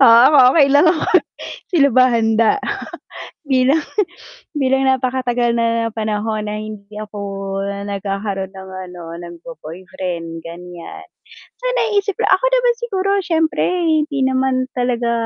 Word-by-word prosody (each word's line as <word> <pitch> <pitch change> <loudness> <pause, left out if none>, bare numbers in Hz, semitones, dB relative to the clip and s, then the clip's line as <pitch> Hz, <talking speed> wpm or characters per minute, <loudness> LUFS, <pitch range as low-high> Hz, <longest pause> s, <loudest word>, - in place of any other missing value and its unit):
ah, 255 +2 +7
okey 280 -3 +5
lang 300 +4 +6
ako. 320 -1 +1 0.6
Sila 295 -7 +4
ba 255 +1 +5
handa 230 - +2 0.9
bilang 265 +4 +3 0.7
bilang 270 -3 +1
napakatagal 250 -2 +1
na 230 0 +1
panahon 215 0 -2
na 210 0 -4
hindi 215 -1 -9
ako 210 -1 -8 0.7
nagkakaroon 195 -1 -3
ng 190 0 -10 0.2
ano 170 -2 -8
ng 170 0 -10
bo 245 +7 -10
boyfriend, 170 0 -6
ganyan. 175 +1 -9 0.6
So, - - -13
naiisip 410 -4 0
ko - - -2
ako - - +4
naman - - +2
siguro 395 -5 -2
siyempre 325 -3 0 0.2
hindi 305 -3 +1
naman 260 0 +1
talaga 245 -1 0
240 Hz, 125 wpm, -18 LUFS, 200-280 Hz, 0.9 s, ah